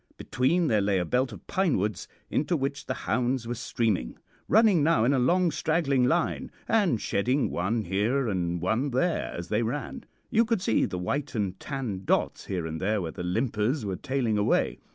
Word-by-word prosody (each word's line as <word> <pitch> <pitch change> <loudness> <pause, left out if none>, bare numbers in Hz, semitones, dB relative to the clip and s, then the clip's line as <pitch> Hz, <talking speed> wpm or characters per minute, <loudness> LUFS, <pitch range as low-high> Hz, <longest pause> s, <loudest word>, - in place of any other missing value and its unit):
Between, 160 +8 +1
there 110 -8 +2
lay 100 -1 +1
a 90 - 0
belt 125 +7 0
of 100 -6 -11
pine 185 -5 +1
woods, 105 +2 -2 0.2
into 155 +3 +1
which 140 0 -3
the - - -2
hounds 125 -1 0
were 120 - -2
streaming, 110 - -1 0.3
running 215 -6 +5
now 145 -7 +3
in 135 - +3
a 135 - +2
long, 175 +7 +3
straggling 145 -5 +1
line, 165 +6 0 0.2
and 200 - +2
shedding 125 +10 0
one 105 +6 -1
here 110 +8 0
and 90 -4 -1
one 110 - 0
there 155 +7 0
as 85 - -6
they 105 +1 +1
ran. 125 +6 -4 0.3
You 230 - +4
could 225 -2 0
see 110 - +2
the 90 - -4
white 135 +10 -3
and 100 -3 -2
tan 125 -10 -4
dots - - 0
here 90 -4 -2
and 80 0 -5
there 105 +3 +1
where 85 -4 -3
the - - -7
limpers 110 - -1
were 95 -2 -2
tailing 130 -4 -1
away. 105 - +1
120 Hz, 195 wpm, -27 LUFS, 100-145 Hz, 0.3 s, running